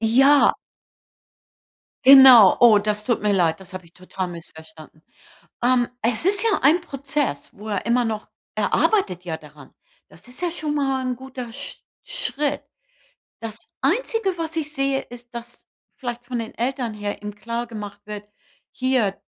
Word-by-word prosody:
Ja. 270 +6 +5 1.5
Genau. 260 -6 +9
Oh, 225 -4 +7
das 210 0 -2
tut 240 -4 0
mir 210 -1 +2
leid. 170 -3 +1
Das 190 0 -13
habe 185 -2 -8
ich 170 - -23
total 185 0 -6
missverstanden. 160 -2 -13 0.6
Ähm, 245 -1 +3
es 230 +4 +1
ist 400 +2 +3
ja 445 -3 +2
ein 315 +6 +4
Prozess, 275 - -3
wo 210 +2 -11
er 200 - -2
immer 240 +1 +2
noch 220 -2 -4 0.3
er - - -1
arbeitet 185 - +1
ja 165 -3 -4
daran. 150 -3 -16 0.4
Das 185 +7 -16
ist 250 +5 -10
ja 350 -2 -1
schon 305 -3 -3
mal 270 -2 0
'n 250 -1 -2
guter 255 -2 -8
Sch 280 +2 -8 0.2
Schritt. 290 0 -3 0.8
Das 225 -2 -6 0.3
Einzige, 390 - 0
was 325 0 -4
ich 305 -2 -3
sehe, 275 -1 0
ist, 245 0 -14
dass 235 0 -10 0.3
vielleicht 245 -2 -6
von 245 -1 -4
den 225 -1 -7
Eltern 245 -1 -2
her 205 -1 -5
eben 210 0 -7
klargemacht 220 -2 -6
wird: 210 -1 -8 0.4
„Hier, 255 -7 0
240 Hz, 160 wpm, -22 LUFS, 205-275 Hz, 1.5 s, Genau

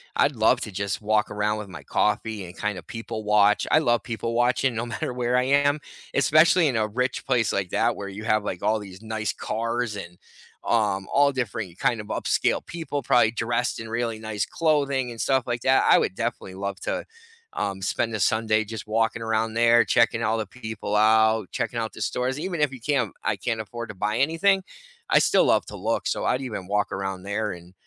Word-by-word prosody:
I'd 140 -2 +2
love 115 +3 +3
to 110 - -5
just 100 +2 -3
walk 105 0 +1
around 105 +1 -1
with 105 -2 -6
my 80 -7 -10
coffee 105 +3 -1
and 90 - -11
kind 105 -2 -2
of 85 - -10
people 115 -1 -6
watch. 105 0 +4
I - - +6
love 120 -6 +1
people 115 -1 -3
watching 125 +2 +2
no 115 +1 -2
matter 120 - -4
where 125 0 0
I 125 - +3
am, 145 +2 +3 0.3
especially 155 +5 +5
in 120 - -1
a 110 -1 +1
rich 125 +4 -2
place 120 -6 +2
like 95 -3 -2
that - - +1
where 100 - -5
you 100 +3 -8
have 110 -1 +1
like 90 - -4
all 110 0 +2
these 95 -2 -11
nice 110 -2 -3
cars 115 0 -2
and, 90 -3 -9 0.5
um, 105 -4 +1
all 140 0 +5
different 110 -8 -4
kind 115 -3 +1
of 105 - -12
upscale - - 0
people 145 -4 -4
probably 120 -2 +4
dressed 120 +2 -1
in 115 - -7
really 115 -1 -2
nice 110 -2 -2
clothing 140 -6 0
and 115 -3 -6
stuff 130 0 +2
like 120 -1 -2
that. 130 +1 +4
I - - +8
would - - -1
definitely 115 -5 -4
love 100 0 -4
to, - - -3 0.5
um, 95 -1 -3
spend 115 +3 0
the 110 - -2
Sunday 110 +2 +2
just 110 0 -7
walking 115 +1 0
around 110 0 0
there, 115 0 +5
checking 115 +3 +2
all 110 +1 +1
the 110 - -3
people 110 -2 -5
out, 110 -1 +4
checking 115 -1 -3
out 110 -1 -3
the - - -10
stores. 125 +5 -1
Even 175 0 -3
if 150 -3 +2
you 125 - -10
can't 130 -6 0
I 110 - +1
can't 110 +3 -2
afford 115 +2 -7
to 105 - -7
buy 105 +3 -1
anything, 175 +7 +2 0.5
I - - +6
still - - +4
love - - +3
to - - -8
look. - - -1
So - - -1
I'd 130 - +1
even 110 -8 -5
walk 105 +1 0
around 95 -1 -3
there 105 +1 -2
and 90 +1 -11
110 Hz, 215 wpm, -25 LUFS, 105-125 Hz, 0.5 s, I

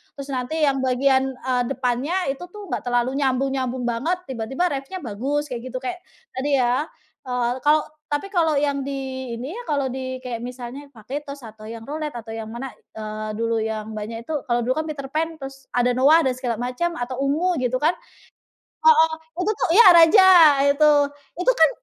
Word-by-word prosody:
terus 275 0 -8
nanti 260 +5 -2
yang 275 -1 +1
bagian, 265 +1 +2
eee, 255 -1 -1
depannya 260 +5 -1 0.2
itu 275 - -15
tuh 415 -1 -9
enggak - - -2
terlalu 245 +1 +1
nyambung-nyambung 260 -1 0
banget, 255 +10 0
tiba-tiba 260 +6 -2
reff-nya 275 +7 -4
bagus, 265 +7 -2
kayak 240 -2 -4
gitu, - - -3
kayak 365 -1 -4 0.3
tadi 275 +2 0
ya, 250 +5 +1 0.4
eee, 250 -1 0 0.2
kalau 305 +1 +5 0.3
tapi 290 +6 -1
kalau 325 -4 +2
yang 285 -1 0
di - - -3 0.4
ini 245 +3 -6
ya, - - -7
kalau 280 -3 +1
di 260 0 -4
kayak 245 -2 -4
misalnya 250 +3 -8
Vagetoz 280 +6 -7
atau 215 -1 -11
yang 230 0 -8
Roullete 300 +2 -5
atau 225 0 -10
yang 225 -1 -6
mana, 245 +3 -6 0.2
eee, 215 0 -5
dulu 230 0 0
yang 220 0 -3
banyak 225 +2 -6
itu 315 - -5
kalau 240 -1 +1
dulu 255 +2 0
kan 315 - -2
Peterpan, 310 +3 -3
terus 270 -1 -9
ada 245 0 +3
Noah 280 +7 +5
dan 260 - +2
segala 245 -2 -2
macam, 295 +8 -2
atau 245 -1 -4
Ungu 320 +4 +1
gitu 255 0 0
kan 315 +5 +3 0.9
heeh 320 -9 +6 0.3
itu 375 - 0
tuh - - +1
ya 470 - +8
Radja 335 +4 +7 0.5
itu. 300 +1 +4 0.5
Itu 430 +8 +4
kan - - +7
265 Hz, 180 wpm, -23 LUFS, 245-295 Hz, 0.9 s, ya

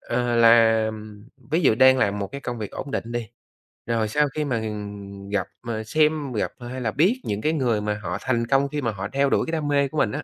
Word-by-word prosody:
ờ, 120 0 -1
làm 110 -2 +3 0.3
ví 165 - +3
dụ 120 - +5
đang 130 +2 +6
làm 100 -2 +1
một 100 - -2
cái 140 +8 -8
công 120 -3 -5
việc 105 -2 -5
ổn 140 - -7
định 120 -3 -3
đi, 120 -3 -3 0.6
rồi 115 -2 0
sau 150 +7 +2
khi 150 - -1
mà 125 -5 -1 0.7
gặp 100 -2 0 0.2
mà 115 -2 -3
xem 150 +2 +1
gặp 105 - -1
hay 125 +1 -6
là 110 -3 -1
biết 190 - +2
những 105 +1 -3
cái 155 +1 +1
người 120 -8 +1
mà 105 0 -2
họ 90 0 -3
thành 120 -3 0
công 140 +1 +2
khi 145 +1 -3
mà 115 -3 0
họ 95 -1 -5
theo 140 0 +2
đuổi - - +2
cái - - -3
đam 155 -3 -2
mê 140 -1 +2
của 155 - -8
mình 105 - +2
á. - - -4
120 Hz, 245 wpm, -24 LUFS, 110-140 Hz, 0.7 s, đang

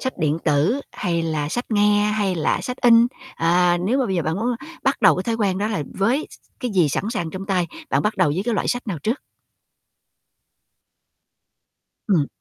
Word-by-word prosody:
Sách 260 - -2
điện 155 +1 +1
tử, 155 - +2
hay 170 -1 -1
là 155 -3 -2
sách 245 +9 -2
nghe, 205 -1 +3
hay 205 -3 0
là 160 - 0
sách 250 - -4
in? 235 -1 +6 0.3
À, 175 +1 +3
nếu 255 +6 +2
mà 260 - +1
bây 190 - -1
giờ 170 - 0
bạn 160 +1 -1
muốn 235 - 0 0.3
bắt 270 +1 0
đầu - - +6
cái 185 - -1
thói 230 +3 -1
quen 195 -4 0
đó 210 +2 0
là 205 -9 -2
với 240 +10 +1
s - - -12 0.3
cái 250 -3 -2
gì 180 -6 +3
sẵn 140 - -2
sàng 170 -9 -3
trong 190 +1 -7
tay, 180 -4 +1 0.2
bạn - - +2
bắt 210 +1 -1
đầu 185 -5 +3
với 175 +7 -1
cái 240 - 0
loại - - -1
sách 245 0 -2
nào 185 -7 -3
trước? 235 +6 -1 2.9
Ừm. 165 -8 +3
195 Hz, 210 wpm, -22 LUFS, 170-230 Hz, 2.9 s, in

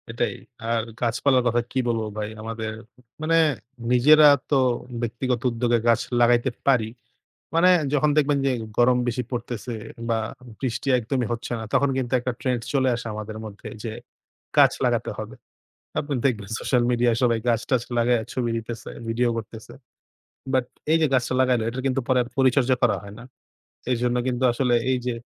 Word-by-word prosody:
এটাই। 115 +1 -1 0.4
আর 115 -1 +1 0.2
গাছপালার 125 +2 +2
কথা 120 0 +2
কী 130 - 0
বলব 115 -2 0
ভাই? 105 -1 -3
আমাদের 110 0 -4 0.5
মানে 160 +1 +2 0.6
নিজেরা 150 +5 +7 0.2
তো 145 - +3 0.5
ব্যক্তিগত 120 +1 -2
উদ্যোগে 120 0 +1
গাছ 115 -1 +4 0.2
লাগাইতে 120 +1 +4 0.2
পারি। 125 -5 +4 0.7
মানে 170 +2 +5 0.2
যখন 150 +1 +3
দেখবেন 145 -1 +3
যে - - +3 0.3
গরম 125 +1 +5
বেশি 120 +1 -1
পড়তেছে 120 -2 -4 0.4
বা 115 -1 +1 0.4
বৃষ্টি 130 0 -3
একদমই 125 +1 -1
হচ্ছে 120 +1 -4
না - - -6
তখন 140 +1 +3
কিন্তু 130 -2 -2
একটা 125 +1 -2
trend 125 -2 0
চলে 135 -2 +2
আসে 115 - -7
আমাদের 110 0 -6
মধ্যে, 105 -1 -9
যে 115 - -4 0.7
গাছ - - +7
লাগাতে - - 0
হবে। - - -7 0.6
আপনি 145 -1 -3
দেখবেন 105 -7 0
সোশাল 125 -2 +1
মিডিয়ায় 120 -1 +2
সবাই 115 -2 +3
গাছ-টাছ 120 +1 +1
লাগাইয়া 120 0 +3
ছবি 120 -2 -1
দিতেছে, 115 0 -6 0.2
video 120 +2 +1
করতেছে। 110 +1 -8 0.8
But 130 -2 +2 0.3
এই 160 - +5
যে - - +5
গাছটা 130 -1 +1
লাগাইল, 125 -2 +3
এটার 125 +2 -5
কিন্তু 135 0 0
পরে 130 -1 +3
আর - - -10
পরিচর্যা 130 -1 +3
করা 115 -4 +4
হয় 100 0 -11
না। - - -10 0.7
এইজন্য 125 0 0
কিন্তু 125 0 -1
আসলে 120 0 0 0.2
এই 130 - +2
যে 125 - 0
120 Hz, 165 wpm, -24 LUFS, 115-130 Hz, 0.8 s, নিজেরা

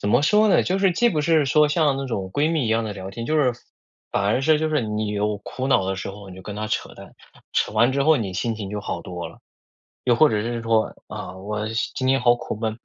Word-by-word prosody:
怎 100 - -2
么 120 +5 +4
说 210 +8 +4
呢？ - - +4
就 190 +2 0
是 195 -2 +4
既 240 +8 +3
不 155 -7 0
是 155 -2 +3
说 150 +3 +4
像 150 -3 +2
那 135 0 -3
种 100 -6 -3
闺 150 +3 +1
蜜 160 -6 0
一 - - -1
样 115 +1 +2
的 110 -2 -4
聊 95 -1 -7
天， 115 +3 -6
就 155 - 0
是 130 -5 +3 0.6
反 100 - 0
而 110 +6 +1
是 155 +1 +4
就 155 - 0
是 150 -3 +1
你 105 -1 -2
有 105 0 -1
苦 130 +5 -5
恼 95 -8 +3
的 95 - -1
时 100 +1 -5
候， 100 0 -11
你 90 - -10
就 95 - -11
跟 105 +1 -7
他 110 0 -3
扯 - - -3
淡， - - -13 0.4
扯 - - +1
完 120 +4 +3
之 140 0 +1
后 155 +1 +5
你 100 -6 -3
心 115 +3 -1
情 100 -3 -5
就 105 0 -4
好 - - -4
多 90 -1 -6
了。 - - -16 0.7
又 120 -2 +3
或 155 +5 +6
者 105 -1 0
是 120 0 -3
说， 115 -1 +1
啊， 90 - -7
我 105 +3 -4 0.3
今 130 - -1
天 135 +1 +3
好 120 -1 +5
苦 120 - -5
闷， 110 0 -3
115 Hz, 295 characters per minute, -23 LUFS, 105-145 Hz, 0.7 s, 或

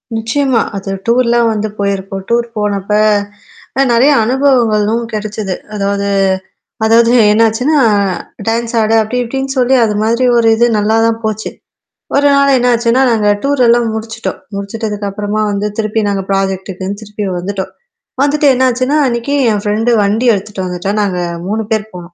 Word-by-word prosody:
நிச்சயமா. 235 +2 0 0.2
அது 195 0 -5 0.2
டூர்லாம் 235 -1 +2
வந்து 215 0 -2
போயிருக்கும். 195 -1 -3
டூர் 235 0 +1
போனப்ப 205 -1 -2 0.9
அ - - +5
நெறைய 250 +5 +4
அனுபவங்களும் 235 -3 +1
கெடைச்சது. 210 -2 -3 0.2
அதாவது 200 0 -1 0.8
அதாவது 230 +1 +4 0.2
என்னாச்சுன்னா 225 +7 +2 0.7
டான்ஸ் 230 +1 -1
ஆட 215 +1 +1
அப்பிடி 250 +4 -2
இப்பிடின்னு 265 +3 -3
சொல்லி 255 +1 +3
அதுமாதிரி 220 +3 0
ஒரு 230 -1 +3
இது 235 +2 +3
நல்லா 210 +1 +1
தான் 230 0 0
போச்சு. 215 0 -3 0.7
ஒரு 285 +1 +4
நாள் 280 0 +3
என்னாச்சுன்னா, 240 0 +2
நாங்க 220 -3 +1 0.2
டூர் 280 -1 0
எல்லாம் 235 0 +3
முடிச்சுட்டோம். 225 +1 -5 0.2
முடிச்சுட்டதுக்கு 205 +1 -4
அப்புறமா 205 +1 -3
வந்து 200 +1 -1
திருப்பி 220 0 -1
நாங்க 200 -1 -1
ப்ராஜெக்ட்டுக்ன்னு 195 0 -2
திருப்பி 210 0 -6
வந்துட்டோம். 190 +1 -4 0.5
வந்துட்டு 290 +1 +2
என்னாச்சுன்னா, 255 +3 +1
அன்னக்கி 235 +3 -2 0.2
என் 205 -1 -1
ஃபிரண்ட் 215 +3 +1
வண்டி 215 +5 0
எடுத்துட்டு 195 -1 -4
வந்துட்டா. 180 +2 -3
நாங்க 195 -3 -1 0.3
3 220 +2 -1
பேர் 220 -1 -1
போனோம். 175 -1 -10
220 Hz, 140 wpm, -13 LUFS, 205-240 Hz, 0.9 s, அ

